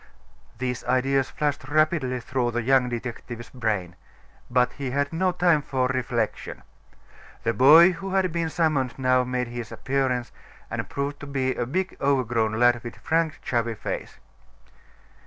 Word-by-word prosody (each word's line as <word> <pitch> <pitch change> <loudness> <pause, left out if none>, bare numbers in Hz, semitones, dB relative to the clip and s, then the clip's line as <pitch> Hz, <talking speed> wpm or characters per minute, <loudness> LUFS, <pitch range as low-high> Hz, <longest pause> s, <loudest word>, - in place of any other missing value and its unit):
These 125 0 -3
ideas 130 +1 +1
flashed 145 -3 -2
rapidly 155 -4 +1
through 125 0 -1
the 120 0 -2
young 130 0 +3
detective's 120 0 -6
brain. 105 -8 -2 0.5
But 125 0 +2
he 140 -2 -4
had 140 +3 -1
no 185 +3 +1
time 175 -4 +3
for 130 -2 -1
reflection. 120 -4 -2 0.8
The 115 0 +1
boy 160 +9 +8
who 195 +2 -5
had 185 -2 +2
been 165 -1 -1
summoned 155 -7 0
now 130 -1 +3
made 125 -1 -2
his 120 -2 -6
appearance, 130 +1 -1 0.4
and - - -4
proved 140 +1 -3
to 145 - -8
be 130 -2 0
a 120 - -3
big 185 +7 -2
overgrown 120 -5 +1
lad 120 +1 +3
with 120 0 -7
frank, 160 -1 -1
chubby 115 -2 -1
face. - - -5
130 Hz, 150 wpm, -25 LUFS, 120-145 Hz, 0.8 s, boy